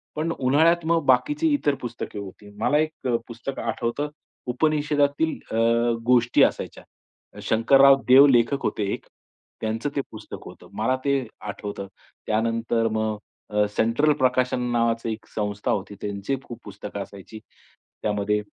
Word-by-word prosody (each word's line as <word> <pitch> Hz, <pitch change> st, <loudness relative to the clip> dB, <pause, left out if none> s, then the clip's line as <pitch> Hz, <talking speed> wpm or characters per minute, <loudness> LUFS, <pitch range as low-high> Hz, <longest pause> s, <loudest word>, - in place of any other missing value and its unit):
पण 160 Hz, +2 st, -1 dB
उन्हाळ्यात 160 Hz, +6 st, +3 dB
मग 165 Hz, -2 st, +1 dB
बाकीची 295 Hz, -, +3 dB
इतर 145 Hz, -, +1 dB
पुस्तकं 120 Hz, -3 st, -6 dB
होती. 100 Hz, +1 st, -10 dB
मला 150 Hz, +6 st, +2 dB
एक 155 Hz, -3 st, -2 dB
अ, 120 Hz, -, +2 dB
पुस्तक 120 Hz, +3 st, -6 dB
आठवतं 140 Hz, +5 st, -2 dB, 0.4 s
उपनिषेदातील 150 Hz, +1 st, +1 dB
अ, 110 Hz, -, -1 dB, 0.5 s
गोष्टी 120 Hz, -1 st, +4 dB
असायच्या. -, -, -1 dB, 0.6 s
शंकरराव 135 Hz, +4 st, +5 dB
देव 135 Hz, +2 st, +9 dB
लेखक 130 Hz, +2 st, +3 dB
होते 105 Hz, -, -1 dB
एक -, -, -6 dB, 0.6 s
त्यांचं 110 Hz, +5 st, -2 dB
ते 140 Hz, -, +1 dB
पुस्तक 110 Hz, -1 st, -9 dB
होतं. -, -, -13 dB
मला 110 Hz, +5 st, +1 dB
ते 140 Hz, 0 st, +3 dB, 0.2 s
आठवतं. 100 Hz, -1 st, -6 dB, 0.4 s
त्यानंतर 115 Hz, +1 st, 0 dB
मग 110 Hz, -1 st, -1 dB, 0.3 s
अ, 105 Hz, 0 st, +3 dB
सेंट्रल 120 Hz, +7 st, +3 dB
प्रकाशन 125 Hz, -1 st, +2 dB
नावाची 115 Hz, -1 st, 0 dB
एक 110 Hz, -, -10 dB
संस्था 105 Hz, -1 st, -2 dB
होती. 100 Hz, +1 st, -3 dB
त्यांची 100 Hz, +5 st, -2 dB
खूप 120 Hz, -1 st, -9 dB
पुस्तकं 100 Hz, 0 st, -7 dB
असायची. 100 Hz, +3 st, -12 dB, 0.6 s
त्यामध्ये 105 Hz, 0 st, 0 dB
120 Hz, 135 wpm, -24 LUFS, 110-140 Hz, 0.6 s, देव